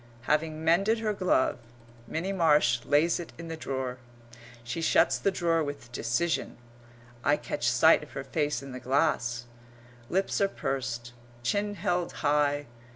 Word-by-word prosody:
Having 155 +3 0
mended 195 +7 +3
her 220 -1 -1
glove, 185 -11 +1 0.5
Minnie 180 +8 -2
Marsh 150 -9 +3
lays 155 +4 +3
it 170 - -8
in 165 0 -8
the 165 - -4
drawer. 130 -4 -4 0.6
She 120 +7 -4
shuts 160 - +3
the - - +2
drawer 170 -3 +1
with 145 -5 -6
decision. 155 +8 -1 0.7
I 145 +1 +3
catch - - -1
sight - - +5
of - - -12
her 135 - -4
face 145 -1 -1
in 135 - -8
the 130 - -6
glass. 125 -3 0 0.6
Lips 190 +2 0
are 200 - +5
pursed. 120 -6 -3 0.3
Chin 205 - 0
held 175 -1 -1
high. 145 0 +2
150 Hz, 150 wpm, -28 LUFS, 130-170 Hz, 0.7 s, sight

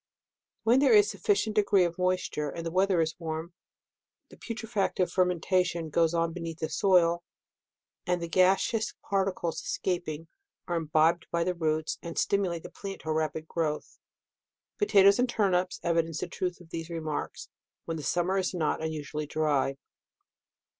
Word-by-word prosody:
When 235 +4 +5
there 285 +9 +5
is 415 -2 +7
a - - -4
sufficient 310 - 0
degree 200 -3 +4
of 175 0 -2
mois 185 0 +1
ture, 150 -1 -3
and 165 +3 -6
the 165 - -3
weather 185 -1 +3
is 160 -1 0
warm, 160 +1 -5 0.8
the - - -14
putrefac 225 -3 -3
tive 185 - 0
fermentation 180 -2 +1
goes 165 +1 +2
on 165 0 +1
beneath 165 -2 -5
the 160 -1 -3
soil, 175 -3 +3 0.8
and 180 0 +1
the 170 - -4
gasseous 190 +5 +2
particles 190 -4 -1
escaping, 165 -4 -3 0.4
are 175 - -1
im 165 -2 -2
bibed 160 +2 +3
by 170 0 0
the 180 +1 0
roots, 160 -2 -1
and 170 -1 -7
stimulate 185 -5 0
the - - -9
plants 195 -1 -8
to 160 - -6
a - - +2
rapid 155 0 -2
growth. 155 -3 -3 0.8
Potatoes 200 - +5
and 250 0 +2
turnips 185 -5 +1
evince 165 -2 0
the - - -2
truth 180 0 -3
of 175 -2 -17
these 165 0 -5
remarks, 160 -3 -4 0.4
when 165 - -3
the - - -5
summer 175 +5 0
is 185 0 -2
not 160 -2 0
unusually 150 -1 -4
dry. 145 -3 0
170 Hz, 165 wpm, -29 LUFS, 160-190 Hz, 0.8 s, is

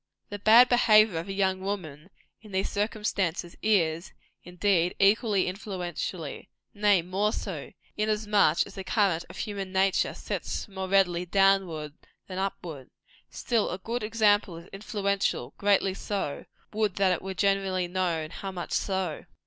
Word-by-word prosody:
The 205 - -6
bad 225 +5 +7
behaviour 215 -7 +5
of 170 - -7
a - - -2
young 190 -1 0
woman, 185 -5 -5 0.3
in 210 -2 -14
these 190 +1 -1
circumstances, 200 -5 -2
is, 170 -6 +1 0.3
indeed, 180 0 +1
equally 200 0 +3
influential 180 -3 -4 0.5
nay, 205 -3 +3
more 195 +4 0
so, 180 -10 -5 0.2
inasmuch 210 -1 +2
as - - -12
the 195 - -6
current 190 -5 +1
of - - -11
human 200 -3 -4
nature 190 0 +1
sets - - -4
more 190 -2 -5
readily 180 -2 +2
downward 185 -6 +2 0.3
than 185 -1 -6
upward. 170 -8 -5 0.4
Still, 230 -4 -1
a 180 - -3
good 230 +6 -4
example 210 -4 +2
is 170 +2 -12
influential 200 -1 -2
greatly 200 -1 +2
so: 195 -7 -4 0.3
would 215 -3 0
that 195 -1 +3
it 175 - -3
were 190 0 -6
generally 195 -2 +1
known 175 -3 -2
how 195 - -6
much 180 -2 -6
so! 190 -5 -2
195 Hz, 145 wpm, -27 LUFS, 180-205 Hz, 0.5 s, bad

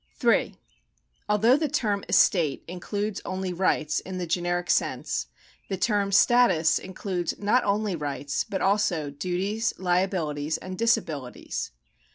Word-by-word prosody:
3. - - +2 0.7
Although 220 +5 +4
the 310 0 0
term 210 -8 -1
estate 160 -7 +3
includes 200 +4 -4
only 185 -1 -3
rights 165 -4 +1
(in 185 0 -7
the 180 - -2
generic 175 +1 -1
sense), - - -1 0.4
the 195 - -2
term 205 -1 +1
status 195 -7 +4
includes 185 -2 -4
not 210 +5 +2
only 205 -1 0
rights, 145 -2 -2
but 195 - -4
also 190 -7 +1
duties, 190 +9 -2
liabilities, 175 -5 0
and 185 0 -7
disabilities. 165 - -1
185 Hz, 125 wpm, -26 LUFS, 170-205 Hz, 0.7 s, Although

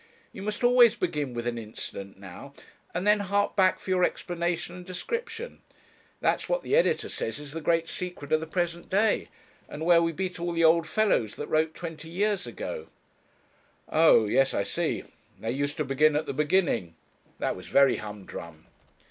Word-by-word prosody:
You - - -8
must 210 +3 -4
always 245 -2 +6
begin 150 - -2
with 120 0 -3
an 120 -1 -2
incident 100 -3 -8
now, 100 +9 -11 0.4
and 180 - -3
then 210 0 +5
hark 205 +1 0
back 190 -2 +4
for 190 - -5
your 180 -1 +3
explanation 175 -1 -1
and 180 - -9
description; 460 - -5 0.6
that's - - +1
what - - 0
the - - +1
editor - - +2
says 115 - -4
is 145 -1 -9
the 165 +2 -5
great 165 +1 +1
secret 175 -6 -6
of 155 - +4
the 160 - -6
present 170 0 -2
day, 210 +3 +2 0.4
and 155 +2 -5
where 170 -1 +6
we 165 0 +1
beat 180 +2 -4
all 175 0 -2
the 165 0 +1
old 165 0 +5
fellows 175 - +1
that - - -5
wrote 155 0 +1
twenty 165 -2 -7
years 200 +3 0
ago.' 480 -2 -6 1.0
'Oh! 160 -8 +5
yes 135 +6 +2
I 100 - +1
see. - - -2 0.4
They 115 - -2
used 145 +3 -2
to 155 - -1
begin 145 +3 +3
at 150 - 0
the - - -4
beginning; 150 - +1 0.4
that - - -1
was 90 - -10
very 140 -1 +4
humdrum.' 95 -6 -9
165 Hz, 180 wpm, -27 LUFS, 140-185 Hz, 1.0 s, always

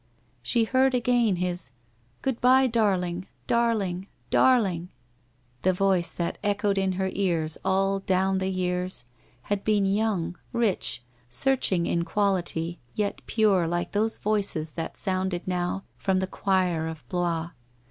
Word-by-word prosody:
She 225 - +2
heard 260 +3 +3
again 240 -4 +2
his 180 -4 -2 0.3
' 120 +1 -38
Good 265 -3 -1
bye, 260 +2 +6
darling 190 -6 0
— - - -39
darling 205 -6 0
— 120 0 -38
dar 255 -1 +6
ling! 180 -5 -2 0.4
' 120 0 -38
The 185 - +3
voice 185 -2 +2
that 170 -1 -3
echoed 205 -1 +1
in 190 -1 +1
her 190 0 -1
ears 165 -5 0
all 195 +1 +1
down 190 0 +1
the 190 0 -1
years, 180 -6 -1 0.4
had 205 -1 -2
been 210 -2 +2
young, 195 -4 0
rich, 220 - 0 0.3
searching 190 - +1
in 170 - 0
quality, 175 -4 0 0.2
yet 205 -1 -1
pure 200 -6 +3
like 175 +1 -2
those 220 +2 0
voices 200 -7 0
that 165 0 -5
sounded 185 -2 -2
now 180 +1 -1 0.2
from 190 -2 +1
the 190 - 0
choir 185 -4 0
of 160 -1 -8
Blois. 170 -2 -1
190 Hz, 150 wpm, -26 LUFS, 175-205 Hz, 0.4 s, bye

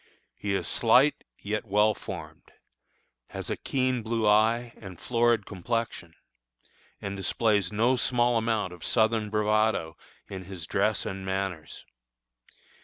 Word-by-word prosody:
He 100 -1 -2
is - - -2
slight, 125 +5 +3
yet 105 +1 -3
well 105 +1 +3
formed; - - -9 0.8
has - - -6
a - - 0
keen 130 -2 -1
blue 110 -1 -1
eye, 115 +3 +3
and 95 -5 -10
florid 120 -3 +2
complexion; 100 -4 -4 0.8
and 100 0 -5
displays 100 0 +1
no 115 +5 +2
small 120 -1 +2
amount 110 -5 0
of 90 - -12
Southern 110 -1 +2
bravado 105 -5 +1 0.3
in 95 -2 -7
his 90 -3 -7
dress - - 0
and 95 0 -5
manners. 95 -4 -4
105 Hz, 125 wpm, -27 LUFS, 95-115 Hz, 0.8 s, slight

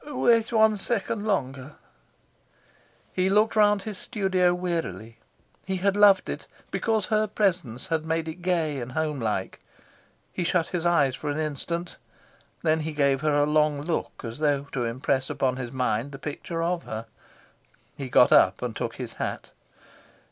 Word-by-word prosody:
"Wait 235 -6 +2
one 220 -1 +4
second 210 +1 -1
longer." 140 -7 -2 1.4
He 185 +1 +1
looked 215 +3 +3
round 210 -2 +4
his 210 -3 -5
studio 190 -5 +1
wearily; 170 -11 -3 0.4
he 190 - -3
had 195 +2 +1
loved 205 -2 +6
it - - -5 0.2
because 220 -4 0
her 215 +1 +1
presence 180 - 0
had 160 -2 -1
made 160 0 -1
it 160 +3 -7
gay 165 -5 0
and 125 +1 -7
homelike; 130 -11 -2 0.7
he 180 - -2
shut 170 -1 +1
his 175 -1 -1
eyes 140 -7 +3
for 150 - -5
an 145 - -2
instant; 155 +3 -3 0.7
then 160 -1 +2
he 160 0 -4
gave 140 -2 +2
her 155 -1 +1
a 145 0 +4
long 150 -1 +2
look 165 +1 -3
as 115 +3 -6
though 145 -2 +1
to 125 -3 -1
impress 130 +3 -1
on 130 -1 0
his 125 -2 -5
mind 125 +1 -1
the - - -6
picture 160 +4 -4
of 175 0 -1
her. 110 +1 -5 0.9
He 135 -2 -6
got 125 - +5
up - - +5
and 120 -2 -3
took 115 -2 -3
his 125 -3 -6
hat. - - -4
160 Hz, 160 wpm, -26 LUFS, 135-190 Hz, 1.4 s, loved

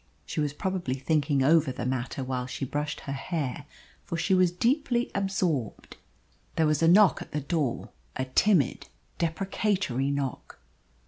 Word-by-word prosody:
She - - -4
was 150 -1 0
probably 175 -3 -2
thinking 140 0 +1
over 155 0 +4
the 125 - -5
matter 130 +1 -2
while 130 -1 -3
she 135 - -4
brushed 145 +3 -3
her 140 - -5
hair, 145 -1 -3 0.4
for 170 - -4
she 190 +4 +1
was 185 -1 +5
deeply 240 - +1
absorbed. 185 - -2 0.6
There 160 - +3
was 155 0 +1
a 165 - +4
knock 190 +2 +6
at - - -10
the 150 - -1
door 145 -3 -2 0.3
a 130 - -1
timid, 150 - +2 0.3
deprecatory 170 - 0
knock. 140 -3 -3
150 Hz, 150 wpm, -27 LUFS, 135-185 Hz, 0.6 s, knock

